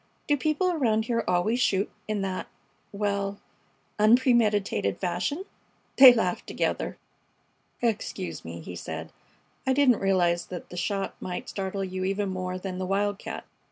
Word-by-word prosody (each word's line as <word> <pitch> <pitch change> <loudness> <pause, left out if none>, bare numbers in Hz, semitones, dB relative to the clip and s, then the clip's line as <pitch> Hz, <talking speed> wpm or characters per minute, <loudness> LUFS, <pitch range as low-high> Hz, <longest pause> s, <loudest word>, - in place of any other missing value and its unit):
Do 290 - +4
people 310 +6 +1
around 225 -9 +1
here 230 -1 0
always 180 +7 +2
shoot 200 -4 +1 0.2
in 210 -2 -1
that 190 -1 -3 0.4
well 200 -1 -2 0.6
unpremeditated 215 - +3
fashion?" 185 - -2 0.5
They 265 -1 +12
laughed 200 -7 -1
together. - - -2 0.9
"Excuse 200 - -2
me," 85 +1 -7
he 90 +2 -8
said. - - -6 0.6
"I 265 - +4
didn't 260 -4 +4
realize 175 -3 +2
the 180 -2 -6
shot 195 +2 -2
might 180 -1 -5
startle 195 0 -3
you 185 0 -3
even 195 +1 0
more 185 -1 -3
than 185 0 -5
the 185 - -2
wildcat. 200 +1 -2
200 Hz, 135 wpm, -27 LUFS, 185-230 Hz, 0.9 s, They